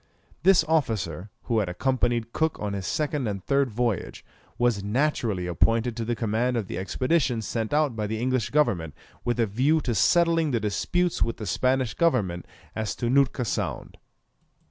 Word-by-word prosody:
This 185 -1 +5
officer, 110 - -1
who 115 -2 +1
had 100 -4 -1
accompanied 120 +3 0
Cook 160 -1 0
on 105 -1 -3
his 95 -2 -4
second 150 -4 -1
and 100 -3 -4
third 140 -1 +2
voyage, 115 -3 -2 0.3
was 120 -5 +1
naturally 110 -4 0
appointed 115 +7 +1
to 115 - -3
the 120 +1 -1
command 115 +3 0
of 110 - -1
the 90 - -5
expedition 130 - 0
sent 110 +1 -3
out 150 -4 +2
by 105 -1 -2
the 110 +1 -3
English 130 -1 0
government 85 - +1 0.3
with 120 0 -1
a 115 - +4
view 130 +10 +2
to 125 -3 -1
settling 165 - +3
the 120 -4 +1
disputes 170 - -1
with 115 - 0
the 110 - -6
Spanish 130 +1 +1
government 105 - 0 0.3
as 110 -4 -2
to 120 0 -1
Nootka 135 -2 +2
Sound. - - -4
120 Hz, 170 wpm, -26 LUFS, 105-135 Hz, 0.3 s, This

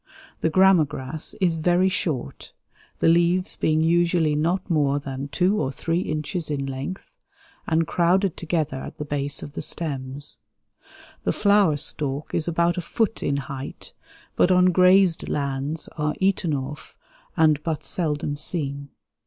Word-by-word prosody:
The 160 - +1
grama 190 0 +5
grass 145 +1 -5
is 175 -4 +2
very 175 +3 +3
short, 160 -8 -3 0.5
the - - +4
leaves 175 +2 +3
being 155 0 +1
usually 170 -1 +2
not 170 +5 0
more 145 -5 +2
than 135 -1 -5
2 185 +7 +1
or 130 - -1
3 165 +5 -1
inches 155 0 -3
in 140 -2 -2
length 135 - -6 0.5
and 165 0 +2
crowded 180 +3 +2
together 155 -5 -2
at 140 - -8
the 150 - -5
base 145 -1 -2
of 145 - -8
the - - -5
stems. 140 -3 -4 0.8
The - - +1
flower 200 -7 +3
stalk 145 0 -3
is 160 - 0
about 170 +1 +1
a - - -2
foot 225 +5 -1
in 140 - 0
height, 135 -1 -7 0.4
but - - +4
on 180 0 +5
grazed 185 -1 +4
lands 140 +2 -2
are 150 0 0
eaten 190 -5 +1
off 135 +2 -7 0.4
and 155 -2 +4
but 155 -1 -3
seldom 150 -4 -2
seen. 140 -3 -4
160 Hz, 150 wpm, -24 LUFS, 145-180 Hz, 0.8 s, grama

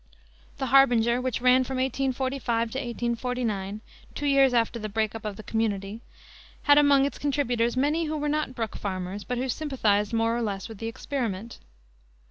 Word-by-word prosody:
The 270 - -2
Harbinger, 245 -2 +4
which 255 -2 -2
ran 255 +1 +5
from 260 +1 -4
1845 260 -3 -1
to 265 - -3
1849 235 -4 -3 0.3
two 290 - -3
years 275 -2 +5
after 235 -1 +1
the 215 -1 -4
break 220 0 -1
up 225 -1 -8
of 210 -2 -3
the 215 - -10
community 210 -1 -2 0.6
had 290 -1 +6
among 280 -2 +5
its 285 - -4
contributors 250 -5 0
many 300 +5 +1
who 310 0 -2
were 295 0 -2
not 295 -3 -1
Brook 225 -3 -3
Farmers, 190 0 -4
but 250 - -3
who 255 +2 -1
sympathized 230 -8 0
more 230 0 +1
or 240 - -1
less 200 -4 -3
with 220 -3 -10
the 225 - -4
experiment. 230 -3 -4
240 Hz, 175 wpm, -26 LUFS, 220-270 Hz, 0.6 s, had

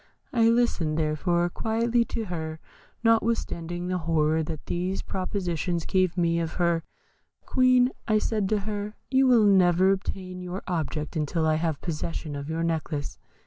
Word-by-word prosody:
I 230 -2 +4
listened, 230 -10 +1
therefore, 165 +3 +1
quietly 230 +3 +1
to 225 - -4
her, 160 -4 -5 0.4
notwithstanding 220 -7 0
the 180 0 -1
horror 160 -1 +1
that 155 -1 -5
these 180 +2 -2
propositions 180 -3 -2
gave 185 -1 +1
me 170 -1 +2
of 165 -1 -2
her. 170 -2 +1 0.6
'Queen,' 255 -1 +4 0.3
said 215 0 0
I - - 0
to 215 +1 +1
her, 210 +1 -4 0.2
'you 265 0 +4
will 235 -4 +5
never 185 -1 +5
obtain 185 -1 -4
your 180 +2 -5
object 155 -3 -3
until 160 +1 0
I 155 0 +3
have 160 -3 -2
possession 160 -2 -4
of 140 +1 -6
your 165 +1 -1
necklace. 160 -3 -2
175 Hz, 150 wpm, -26 LUFS, 160-210 Hz, 0.6 s, will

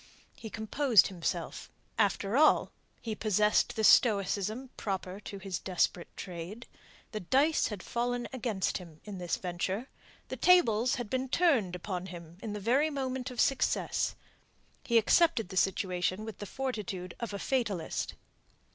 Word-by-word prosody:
He 220 - -8
composed 225 +1 +3
himself. 175 -4 -4 0.3
After 200 0 +1
all, 305 +3 +5 0.3
he 225 - -3
possessed 210 0 +2
the 220 - -1
stoicism 215 +3 +3
proper 190 -1 -4
to 205 -1 -8
his 195 -2 -4
desperate 180 -1 0
trade. 185 +5 -7 0.5
The 215 - -3
dice 275 - +2
had 205 -5 -6
fallen 245 0 -2
against 220 -8 -1
him 165 -4 -13
in 205 -3 -7
this 175 -1 -1
venture. 185 +7 -3 0.4
The - - -4
tables 255 -10 +4
had 245 -3 -4
been 260 +4 -2
turned 255 - +2
upon 180 0 -4
him 170 -1 -10
in 215 - -4
the 210 - -4
very 260 +9 +2
moment 260 -3 -3
of 250 -2 -8
success. 270 -2 +1 0.7
He 235 - +3
accepted 235 - +4
the 190 - -7
situation 185 +2 0
with 220 - -8
the 205 - -6
fortitude 205 -9 -4
of 235 -3 -4
a 200 - -4
fatalist. 205 -9 -2
210 Hz, 145 wpm, -31 LUFS, 185-250 Hz, 0.7 s, all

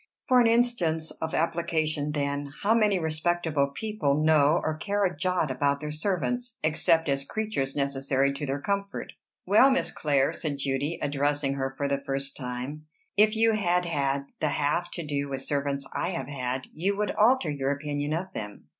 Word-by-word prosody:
"For 250 -1 +6
an 235 - +4
instance 230 -10 +2
of 160 - -2
application, 155 -3 0
then: 140 -1 -2
How 210 +3 +4
many 210 -4 +3
respectable 160 -2 0
people 150 -3 -1
know 155 0 +4
or 155 - -1
care 200 +5 0
a 180 - -1
jot 180 -2 0
about 140 +2 +1
their 150 0 -5
servants, 210 +9 -2
except 160 +1 +3
as 140 -1 +1
creatures 175 -7 -3
necessary 140 -1 +1
to 145 +1 -4
their 135 +1 -1
comfort?" 200 +4 -3 0.3
"Well, 210 +8 +6
Miss 265 - +1
Clare," 140 -3 +1
said 145 -3 -3
Judy, 140 +4 -1
addressing 145 0 0
her 135 -1 -3
for 140 - 0
the 140 0 -1
first 135 0 -3
time, 130 +4 -6 0.3
"if 215 +2 +5
you 225 +1 +4
had 180 -4 +1
had 140 -4 -1
the 155 - +1
half 145 +5 0
to 170 - -5
do 140 -1 -2
with 135 -1 -3
servants 140 -1 -1
I 175 - -1
have 170 -9 -4
had, 130 -2 -3
you 195 +6 -1
would 210 0 0
alter 220 - +3
your 135 -2 -1
opinion 145 +1 -2
of 180 +4 -3
them." 105 -1 -7
150 Hz, 180 wpm, -27 LUFS, 140-180 Hz, 0.3 s, For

